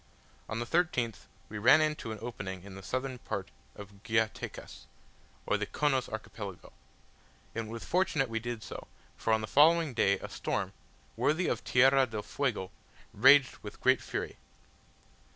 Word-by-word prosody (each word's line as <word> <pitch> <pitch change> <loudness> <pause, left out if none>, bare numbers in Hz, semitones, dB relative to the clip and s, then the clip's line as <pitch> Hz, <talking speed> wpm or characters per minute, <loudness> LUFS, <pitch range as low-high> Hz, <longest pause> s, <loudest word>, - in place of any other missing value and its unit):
On 110 - -3
the 120 - -2
13th 125 - 0 0.2
we 105 - -6
ran 130 +8 +7
into 155 -7 -1
an 110 - -5
opening 95 -6 -6
in 100 -1 -10
the 95 - -9
southern 130 +5 -3
part - - -5 0.2
of 100 -1 -12
Guayatecas, 110 -1 -2 0.6
or 105 - +1
the 105 0 -3
Chonos 135 -1 0
Archipelago; 110 -3 -7 0.8
and 115 -1 -3
it - - -8
was 115 0 -6
fortunate 165 -7 +1
we 115 -1 -2
did 120 -1 -5
so, - - -8 0.3
for 115 - -1
on 110 0 +3
the 110 - -4
following 160 +1 +5
day 100 -4 +3
a - - -7
storm, - - -3 0.4
worthy 160 +5 +1
of - - -1
Tierra 135 +1 +5
del 110 -2 -5
Fuego, 115 -9 -2 0.4
raged 135 +4 +6
with - - -10
great - - +4
fury. - - -4
115 Hz, 160 wpm, -31 LUFS, 105-135 Hz, 0.8 s, ran